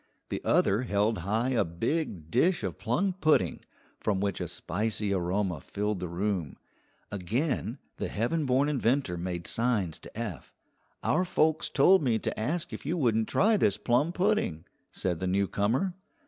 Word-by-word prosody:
The - - -3
other 100 +5 +3
held 105 -2 +1
high 110 +8 0
a 125 -5 +2
big 85 - -2
dish 165 - +3
of 95 -4 -4
plum 175 - 0
pudding, 125 - +3 0.4
from 100 -3 0
which 100 -1 -1
a - - -2
spicy 105 -1 -2
aroma 90 -1 0
filled 105 +3 -2
the 90 - -3
room. 90 -3 -2 0.5
Again 115 - -1 0.2
the - - -2
heaven 135 +8 -1
born 130 +3 +3
inventor 130 -7 +1
made 85 -1 -4
signs 110 -9 0
to - - -13
Eph. 110 -7 -6 0.5
"Our 180 - +2
folks 160 -3 +1
told 185 +7 +5
me 120 -6 +2
to - - -3
ask 155 +10 -1
if - - -6
you 160 +5 -1
wouldn't 115 -7 +2
try 215 +1 +4
this 100 - +2
plum 130 +8 +2
pudding," 180 - 0 0.3
said 90 -3 -1
the 95 - -2
newcomer. 100 - +1
110 Hz, 160 wpm, -29 LUFS, 95-145 Hz, 0.5 s, told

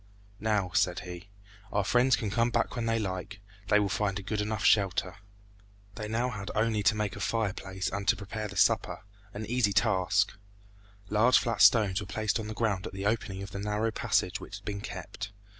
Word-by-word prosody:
"Now," 105 -4 0
said 90 -1 +2
he, 90 +2 -9 0.4
"our 105 - +1
friends 125 +5 +4
can 105 -3 -3
come 115 +2 +2
back 120 +1 0
when 115 -2 -2
they 115 0 +2
like. 100 -1 -4 0.3
They 105 0 +5
will 105 - +2
find 100 0 -1
a 100 - -6
good 105 +2 -2
enough 105 -1 -2
shelter." 95 -2 +2 0.8
They 105 +1 -5
now 120 +3 0
had 100 -4 -6
only 110 0 +1
to 105 - +3
make 105 -3 -2
a - - -8
fireplace 100 -3 -2
and 100 0 -3
to - - +5
prepare 105 +2 -5
the 100 -1 -9
supper 95 - +2 0.3
an 105 +1 -6
easy 115 -3 +1
task. 100 -1 +2 0.8
Large 115 +4 +5
flat 115 -4 0
stones 105 -2 +5
were 100 - -7
placed 110 +2 -1
on 110 - -5
the 110 - -6
ground 105 -5 0
at - - -9
the 95 +1 -5
opening 100 -3 -1
of 100 - -8
the 100 - -5
narrow 105 +2 -1
passage - - 0
which - - -8
had - - -11
been 100 -1 -4
kept. 100 0 -7
105 Hz, 205 wpm, -29 LUFS, 100-110 Hz, 0.8 s, They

